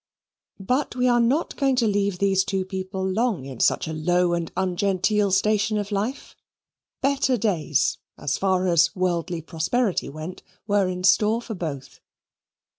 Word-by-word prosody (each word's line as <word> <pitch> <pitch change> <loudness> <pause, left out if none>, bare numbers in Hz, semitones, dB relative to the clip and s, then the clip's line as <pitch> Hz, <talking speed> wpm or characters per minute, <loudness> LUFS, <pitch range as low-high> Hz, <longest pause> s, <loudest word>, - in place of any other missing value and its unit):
But 250 +8 -1
we 250 0 +2
are 240 -1 +4
not 260 +8 +1
going 270 -2 +2
to 240 -3 +2
leave 200 -2 0
these 195 0 +2
two 190 -1 -2
people 190 0 -4
long 205 - 0
in 130 -3 -8
such - - +2
a 160 - -4
low 175 +3 +1
and 170 -1 -2
ungenteel 195 +2 +1
station 210 +2 +2
of 205 0 -3
life. 215 +7 -3 0.7
Better 270 -2 +2
days, 175 - 0 0.2
as 145 - -1
far 185 -1 +1
as 170 -2 +3
worldly 175 -2 -1
prosperity 180 +7 -1
went, 155 +5 -8 0.2
were 205 -3 +2
in 180 0 -4
store 210 +4 +4
for 235 -1 -7
both. 150 -8 -6
190 Hz, 155 wpm, -24 LUFS, 175-215 Hz, 0.7 s, are